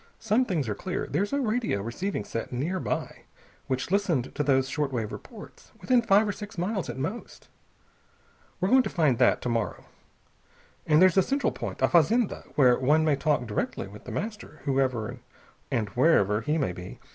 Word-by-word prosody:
"Some 225 +4 +1
things 160 - -1
are 105 - -1
clear. 180 - -4
There's 200 +1 -1
a 280 - 0
radio 230 - 0
receiving 120 - -3
set 115 +1 -5
nearby, 160 +9 -3 0.4
which 130 +5 -2
listened 180 -11 0
to - - -2
those 135 -2 +2
short 145 0 -2
wave 115 -4 -3
reports. - - -11
Within 250 -2 +3
five 210 -1 +4
or - - 0
six 205 +1 -9
miles, 190 +1 -2
at - - -5
most. 165 - -6 1.1
We're 185 - +1
going 260 +3 +6
to - - -3
find 150 -9 +1
that 125 - +3
to 125 - -1
morrow. 115 -2 -2 1.0
And 155 +3 +5
there's 185 0 +5
a - - +8
central 275 +8 0
point, - - -5
a - - +6
fazenda, 195 +7 +2
where 125 -4 +5
one 150 +5 +3
may 150 -2 +3
talk 145 -2 0
direct 105 -2 -2
with 100 +2 -8
The - - -7
Master, 210 -7 -6
whoever 130 -5 0 0.5
and 105 -3 -1
wherever 110 - +3
he 150 +7 0
may 135 - 0
be. 90 +1 -9
150 Hz, 180 wpm, -27 LUFS, 125-200 Hz, 1.1 s, a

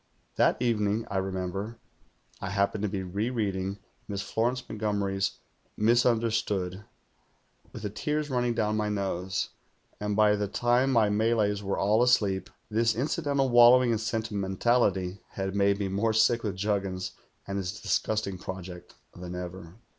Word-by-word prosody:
That - - +3
evening, 110 -2 +1
I 100 - -1
remember, 95 +3 -3 0.6
I 95 - -3
happened 100 +1 0
to 105 - 0
be 95 -1 -3
rereading 100 -1 -2 0.3
Miss 100 -1 -3
Florence 125 +2 -1
Montgomery's 100 -2 -1 0.5
"Misimder 115 +1 +3
stood" 100 -4 -2 0.9
with - - -9
ihc 105 -1 -4
tears 150 +5 -2
running 125 -2 +1
down 105 -2 +1
my 105 -1 0
nose; 95 -2 -2 0.5
and 105 0 -1
THE - - -1
GHOUL 110 - +5
127 105 - +5
by - - +2
the 105 0 -1
time 120 +5 +2
my 110 -4 +4
Malays 105 -1 +1
were 100 -1 -2
all 105 +3 +3
asleep, 105 -6 +2 0.2
this 115 +1 +1
incidental 140 +1 0
wallowing 120 +1 +7
in 110 - +1
sentimentalit\' 105 -3 0
had 95 0 -3
made 100 0 +3
me 100 -1 -1
more 100 +4 0
sick 115 +2 +4
with 100 -3 -3
Juggins 95 -2 -2 0.3
and 100 0 -3
his 95 -1 -4
disgusting 105 -4 -1
project 90 -1 -8 0.2
than 90 0 -7
ever. 90 -1 -7
105 Hz, 155 wpm, -28 LUFS, 95-115 Hz, 0.9 s, wallowing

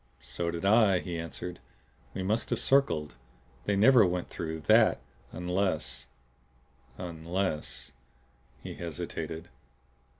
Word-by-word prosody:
"So 75 +8 -3
did 85 +2 -3
I," 105 -2 +5
he 85 -2 -4
answered. 85 +1 -5 0.6
"We 95 - -2
must 110 +5 0
have - - 0
circled. 135 - +2 0.5
They 100 - +1
never 115 +3 +7
went 90 -1 -1
through 80 -1 -4
THAT 75 - +5 0.3
unless 90 -8 -1 0.9
unless 85 -1 -3 0.3
" 60 -2 -33
He - - -6
hesitated. 85 0 -5
85 Hz, 110 wpm, -30 LUFS, 80-95 Hz, 0.9 s, never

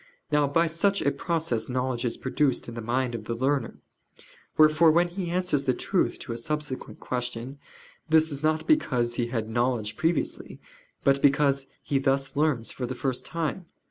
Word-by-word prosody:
Now 150 -1 +3
by 165 +4 +3
such 170 +5 +1
a - - +3
process 160 -10 -2
knowledge 125 -1 -1
is 115 - -2
produced 135 0 0
in 120 - -7
the 115 - -5
mind 120 +2 -1
of 110 -2 -5
the 115 - -3
learner. 135 +3 0 0.8
Wherefore 155 +1 +6
when 170 +2 +3
he 175 0 -4
answers 175 -6 0
the 130 -2 +2
truth - - 0
to - - -6
a 115 - -4
subsequent 150 +1 -4
question, 125 +2 -4 0.5
this 160 0 +4
is 140 -1 -5
not 155 0 +1
because 125 - +2
he 120 0 -1
had 115 -3 -2
knowledge 115 -2 0
previously, 165 +6 -1 0.4
but 140 -1 +3
because 140 -1 +3 0.2
he 140 - 0
thus 135 0 0
learns 145 -6 +1
for 125 - -4
the 130 - -4
first 130 -1 -2
time. 170 +2 -3
135 Hz, 175 wpm, -27 LUFS, 125-155 Hz, 0.8 s, Wherefore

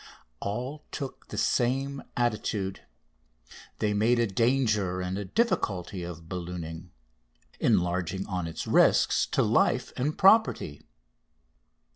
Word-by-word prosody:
All 125 +9 -4
took 135 -2 -6
the - - -7
same 135 +3 0 0.2
attitude. 105 -5 -1 1.0
They 105 -1 0
made 110 +4 +3
a 120 - +3
danger 105 -4 +1
and 90 0 -3
a 100 0 -4
difficulty 95 - -1
of 85 -2 -8
ballooning, 85 -1 -6 0.7
enlarging 90 +2 +1
on 90 -4 -3
its 80 - -5
risks - - +4
to - - +1
life - - +2
and 145 +4 -1
property. 195 - +4
100 Hz, 110 wpm, -28 LUFS, 90-125 Hz, 1.0 s, risks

